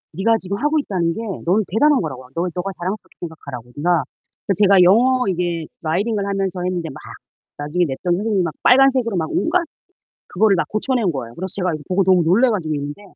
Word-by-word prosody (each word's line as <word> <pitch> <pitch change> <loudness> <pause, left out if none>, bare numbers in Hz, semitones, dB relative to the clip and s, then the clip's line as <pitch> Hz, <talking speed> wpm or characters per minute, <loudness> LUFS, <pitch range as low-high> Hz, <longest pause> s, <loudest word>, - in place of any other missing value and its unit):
네가 225 +5 +2
지금 195 +1 -4
하고 300 +6 +1
있다는 180 - -1
게 - - -5 0.3
넌 195 +6 +2
대단한 290 +8 +3
거라고. 130 -6 -6
아 - - -18
너 170 - 0
네가 180 +2 -3
자랑스럽게 190 +4 -5
생각하라고. 140 -8 -8
네가 170 +1 +2 0.5
제 - - +4
제가 200 0 +6
영어 250 +6 +4
이게 175 -3 -1 0.2
writing 195 +8 0
을 200 - -2
하면서 195 -2 -2
했는데 180 -3 -2
막 135 - -10 0.6
나중에 150 +5 0
냈던 170 +5 -1
선생님이 205 0 0
막 165 -3 -3
빨간색으로 255 -4 +4
막 160 -2 -2
온갖 345 +1 +1 0.7
그거를 200 +1 +3
막 180 - 0
고쳐 235 +5 -1
낸 220 -7 +1
거예요. 120 -5 -6
그래서 185 +5 -4
제가 180 -4 -1
이거 155 - -6
보고 185 +1 +2
너무 185 -1 +4
놀래 200 +11 +4
가지고 165 -8 -2
있는데 145 +6 -5
185 Hz, 465 characters per minute, -20 LUFS, 165-215 Hz, 0.7 s, 제가